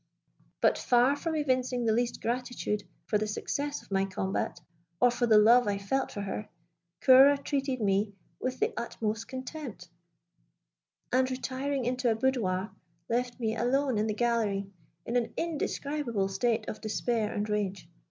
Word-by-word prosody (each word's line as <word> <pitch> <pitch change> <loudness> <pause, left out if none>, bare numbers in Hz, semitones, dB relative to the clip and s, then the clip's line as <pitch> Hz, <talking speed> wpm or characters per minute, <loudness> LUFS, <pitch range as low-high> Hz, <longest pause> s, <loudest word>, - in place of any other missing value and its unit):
But - - +3
far 250 +3 +4
from 320 +2 -3
evincing 255 -4 0
the 220 - +3
least 240 +1 -1
gratitude 240 -3 -2 0.2
for 210 - +1
the 215 - -1
success 285 +7 -3
of - - -23
my 195 0 +2
combat, 190 0 -2 0.4
or 245 - +5
for 240 0 0
the 220 -2 +6
love 230 +3 +6
I 200 -1 +1
felt 260 +7 -1
for 205 - -5
her, 200 +1 -4 0.5
Ceora 270 +2 +8
treated 275 -3 -1
me 200 -1 +1 0.2
with 255 0 -3
the 440 +3 +1
utmost 225 -3 -3
contempt; 260 - -7 1.2
and, 255 0 +3
retiring 260 +1 -2
into 250 0 +1
a 225 - +2
boudoir, 220 -6 0 0.4
left 245 +1 -1
me 225 -2 -1
alone 255 0 +1
in 215 - +1
the 215 - -1
gallery, 215 -5 0 0.3
in 235 - -3
an 240 - -2
indescribable 285 -9 -1
state 220 +3 0
of 215 - -5
despair 220 0 -1
and 210 +1 -2
rage. 200 -4 -2
235 Hz, 155 wpm, -29 LUFS, 210-260 Hz, 1.2 s, Ceora